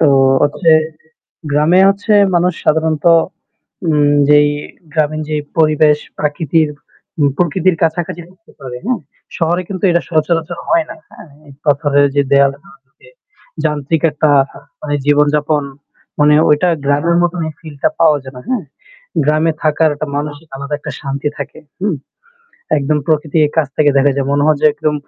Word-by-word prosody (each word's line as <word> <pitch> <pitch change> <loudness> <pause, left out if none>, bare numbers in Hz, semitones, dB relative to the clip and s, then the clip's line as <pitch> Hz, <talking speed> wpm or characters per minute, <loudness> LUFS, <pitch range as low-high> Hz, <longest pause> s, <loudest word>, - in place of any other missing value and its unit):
তো 160 - +4 0.4
হচ্ছে 155 +3 +2 0.8
গ্রামে 155 +5 +3
হচ্ছে 200 +2 0 0.2
মানুষ 175 0 +2
সাধারণত 155 0 0 0.8
উ - - +3 0.4
যেই 150 0 +5 0.4
গ্রামীন 155 -1 0
যে 155 - -1 0.2
পরিবেশ 155 -1 +3 0.2
প্রাকৃতির 150 +1 0 0.5
উ - - +3 0.2
প্রকৃতির 180 +1 +1
কাছাকাছি 165 +1 -1
হতে 185 +4 -23
পারে। 125 -2 -7
হ্যাঁ? 240 -4 -1 0.4
শহরে 175 +2 0
কিন্তু 195 0 -5
এটা 170 0 +1
সচরাচর 165 +1 -1
হয় 335 -1 +2
না। - - -7 0.2
হ্যাঁ? - - -14 0.2
ইট 135 - -16
পাথরের 145 0 +2
যে 140 - +4
দেওয়ালটা 140 +4 +2 0.2
আছে 155 - -22 0.6
যান্ত্রিক 150 +1 -1
একটা 150 +1 +1 0.5
মানে 145 -1 -3
জীবনযাপন 150 +1 +2 0.6
মানে 150 0 +5
ওইটা 150 +4 +3 0.2
গ্রামের 145 +5 +1
মত 175 - +1 0.2
এই - - -7
ফিলটা 150 -3 -2
পাওয়া 155 -3 +4
যায় 130 0 -10
না। - - -8
হ্যাঁ? 250 -8 -1 0.6
গ্রামে 155 +2 +2
থাকার 155 0 +2
একটা 150 +1 -5
মানসিক 150 +2 -5
আলাদা 140 +2 -5
একটা - - -7
শান্তি 140 +1 -3
থাকে। - - -7 0.2
হু? 200 - 0 0.9
একদম 145 +2 0
প্রকৃতির 155 -1 +1
কাছ 155 -4 +2
থেকে 150 -1 +4
দেখা 140 +1 +4
যায়। 135 -1 -1
মনে 145 0 +1
হয় 155 -2 +3
যে - - +6
একদম 150 0 -1
155 Hz, 150 wpm, -15 LUFS, 145-165 Hz, 0.9 s, যে